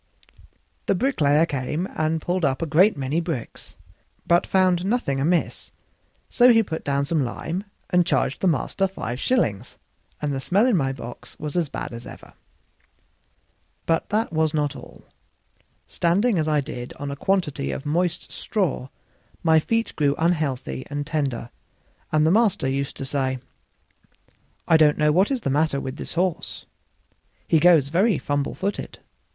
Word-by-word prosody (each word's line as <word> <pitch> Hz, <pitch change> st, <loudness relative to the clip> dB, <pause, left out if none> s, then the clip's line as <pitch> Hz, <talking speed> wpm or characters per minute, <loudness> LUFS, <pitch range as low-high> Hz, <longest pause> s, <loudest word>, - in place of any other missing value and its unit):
The -, -, +3 dB
bricklayer 160 Hz, -, +3 dB
came 150 Hz, +4 st, -3 dB
and 155 Hz, +1 st, 0 dB
pulled 180 Hz, +2 st, -1 dB
up 140 Hz, +2 st, +1 dB
a -, -, +1 dB
great 175 Hz, +6 st, +4 dB
many 140 Hz, +5 st, -1 dB
bricks, 160 Hz, -9 st, -6 dB, 0.5 s
but 170 Hz, 0 st, +3 dB
found 185 Hz, -2 st, +3 dB
nothing 195 Hz, -, 0 dB
amiss; 165 Hz, +5 st, 0 dB, 0.6 s
so 245 Hz, 0 st, +5 dB
he 225 Hz, -1 st, +5 dB
put 160 Hz, -5 st, -5 dB
down 140 Hz, 0 st, 0 dB
some 155 Hz, -1 st, +1 dB
lime 170 Hz, -, -4 dB, 0.3 s
and 180 Hz, -1 st, +4 dB
charged 175 Hz, -, 0 dB
the 190 Hz, -, +2 dB
master 180 Hz, +4 st, +1 dB
five 130 Hz, -10 st, -5 dB
shillings, 120 Hz, -, 0 dB, 0.4 s
and 150 Hz, -1 st, -2 dB
the 135 Hz, -, -2 dB
smell 190 Hz, -, +2 dB
in 250 Hz, -4 st, +3 dB
my 135 Hz, -6 st, +1 dB
box 120 Hz, -2 st, -9 dB
was 150 Hz, +1 st, -5 dB
as 170 Hz, -5 st, 0 dB
bad -, -, -5 dB
as 115 Hz, +1 st, -8 dB
ever. -, -, -12 dB, 1.5 s
But 165 Hz, 0 st, 0 dB
that 215 Hz, -3 st, 0 dB
was 160 Hz, -1 st, +1 dB
not 145 Hz, -2 st, 0 dB
all: -, -, -12 dB, 0.8 s
standing 195 Hz, +4 st, +1 dB
as 155 Hz, -, 0 dB
I 150 Hz, -1 st, +2 dB
did 125 Hz, -2 st, -7 dB
on 145 Hz, 0 st, -6 dB
a -, -, -4 dB
quantity 150 Hz, -4 st, -1 dB
of 135 Hz, -, -5 dB
moist 175 Hz, +3 st, -1 dB
straw 185 Hz, -11 st, -2 dB, 0.6 s
my 160 Hz, -1 st, +5 dB
feet 230 Hz, +8 st, -1 dB
grew 145 Hz, -2 st, +2 dB
unhealthy 155 Hz, -6 st, -1 dB
and 145 Hz, 0 st, -3 dB
tender, 140 Hz, -7 st, -2 dB, 0.6 s
and 155 Hz, 0 st, +3 dB
the 160 Hz, -, +4 dB
master 210 Hz, -, +2 dB
used 135 Hz, +1 st, -2 dB
to 135 Hz, -, -5 dB
say: 130 Hz, -1 st, -1 dB, 1.3 s
"I 160 Hz, -, +6 dB
don't 150 Hz, -2 st, +4 dB
know 150 Hz, 0 st, +3 dB
what 185 Hz, +6 st, +3 dB
is 265 Hz, -3 st, -1 dB
the 135 Hz, -, -1 dB
matter 145 Hz, 0 st, +1 dB
with 130 Hz, +1 st, -6 dB
this -, -, -7 dB
horse; 180 Hz, -1 st, -2 dB, 0.8 s
he 160 Hz, -, +4 dB
goes 160 Hz, -4 st, +5 dB
very 190 Hz, +4 st, +3 dB
fumble 145 Hz, 0 st, -2 dB
footed. 200 Hz, +2 st, -4 dB
155 Hz, 160 wpm, -23 LUFS, 140-180 Hz, 1.5 s, I